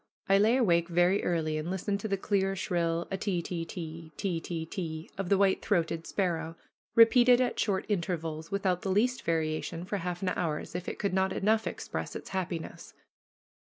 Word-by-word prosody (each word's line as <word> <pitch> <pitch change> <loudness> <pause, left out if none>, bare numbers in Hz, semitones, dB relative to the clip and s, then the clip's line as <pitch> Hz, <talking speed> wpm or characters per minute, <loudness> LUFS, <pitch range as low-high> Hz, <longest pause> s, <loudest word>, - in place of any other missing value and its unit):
I 195 0 +5
lay 225 +5 +4
awake 170 -9 +3
very 175 +3 +3
early 155 -3 0
and 155 +3 -4
listened 195 +2 -1
to 220 - -3
the 195 -1 0
clear, 195 0 0
shrill 170 -2 -1
ah, - - 0
te 190 -2 -1
te, 170 -1 -3
te 165 -1 -7
te, 170 -3 -2
te 160 -2 -5
of 195 -2 -3
the 200 - +4
white 195 -1 +3
throated 165 -4 0
sparrow, 165 -4 -1 0.4
repeated 240 +2 +7
at 250 -1 0
short 195 -3 0
intervals, 165 -5 -2
without 190 -3 0
the 195 - -3
least 240 +6 +2
variation, 165 +1 -1
for 200 +2 -2
half 180 0 -4
an 185 - +1
hour, 165 -4 -1
as - - -8
if 180 +1 -4
it - - -6
could 200 -2 -1
not 190 0 +2
enough 220 +2 +1
express - - -5
its - - -7
happiness. 180 -3 -5
180 Hz, 190 wpm, -30 LUFS, 165-200 Hz, 0.4 s, repeated